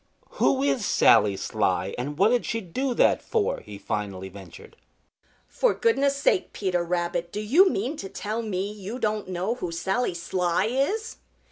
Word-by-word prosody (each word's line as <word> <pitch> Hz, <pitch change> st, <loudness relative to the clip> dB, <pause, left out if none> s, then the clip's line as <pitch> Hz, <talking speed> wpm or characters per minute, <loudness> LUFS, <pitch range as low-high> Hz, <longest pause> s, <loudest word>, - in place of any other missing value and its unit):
"Who 270 Hz, 0 st, +3 dB
is 265 Hz, -5 st, +1 dB
Sally 100 Hz, -, +4 dB
Sly, 95 Hz, -3 st, -1 dB
and 145 Hz, +4 st, -4 dB
what 200 Hz, +5 st, +5 dB
did 245 Hz, 0 st, +2 dB
she 230 Hz, -, -2 dB
do 245 Hz, +7 st, -3 dB
that -, -, +3 dB
for?" 445 Hz, -3 st, -1 dB
he 105 Hz, -1 st, -10 dB
finally 100 Hz, -2 st, -4 dB
ventured. 95 Hz, -3 st, -13 dB, 0.7 s
"For -, -, +1 dB
goodness' 280 Hz, -12 st, +2 dB
sake, 365 Hz, +7 st, +1 dB
Peter 180 Hz, -3 st, -1 dB
Rabbit, 170 Hz, 0 st, -2 dB
do 210 Hz, -, -4 dB
you 300 Hz, -, +5 dB
mean 255 Hz, -, -2 dB
to 195 Hz, -, -6 dB
tell 215 Hz, +4 st, -4 dB
me 200 Hz, -2 st, -3 dB
you 210 Hz, +3 st, -7 dB
don't 215 Hz, -4 st, -1 dB
know 185 Hz, +4 st, -2 dB
who 180 Hz, -9 st, -5 dB
Sally 190 Hz, +4 st, -1 dB
Sly 175 Hz, +1 st, 0 dB
is?" 285 Hz, -, -1 dB
200 Hz, 165 wpm, -25 LUFS, 170-250 Hz, 0.7 s, what